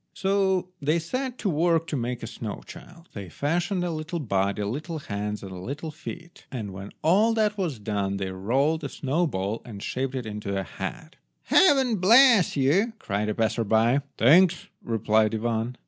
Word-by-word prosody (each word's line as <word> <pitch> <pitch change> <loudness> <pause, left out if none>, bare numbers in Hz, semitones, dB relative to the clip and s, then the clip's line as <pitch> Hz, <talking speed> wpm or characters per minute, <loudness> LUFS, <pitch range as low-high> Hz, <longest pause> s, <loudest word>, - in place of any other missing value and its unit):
So 190 -2 +1
they 150 +4 +2
set 255 +10 -3
to 205 - -1
work 165 +1 +2
to 165 - -4
make 120 -1 -3
a - - -2
snow 115 -2 -6
child. 175 -1 -13
They 100 -4 -7
fashioned 175 - -1
a 175 - -1
little 160 +2 -4
body, 100 - -1
little 150 - -4
hands, 105 -6 -4
and 95 - -8
little 145 - -5
feet, 170 +2 -10
and 110 -7 -5
when 95 +1 -8
all 210 +8 +4
that 215 -1 +1
was 175 - -2
done 100 -2 -2
they 95 -1 -3
rolled 135 +12 0
a 140 - -3
snow 150 +7 0
ball 100 -3 -3
and 105 -4 -9
shaped 130 +1 -3
it 125 -3 -3
into 105 -2 -4
a - - -2
head. 100 - -7 0.3
"Heaven 265 - +4
bless 225 - +6
you!" 175 - +2
cried 105 - -2
a 105 - -2
passer 115 +1 0
by. 115 +5 +3 0.2
"Thanks," 175 +8 +4
replied 110 -1 +1
Ivan. 115 +2 -2
140 Hz, 180 wpm, -26 LUFS, 105-175 Hz, 0.3 s, bless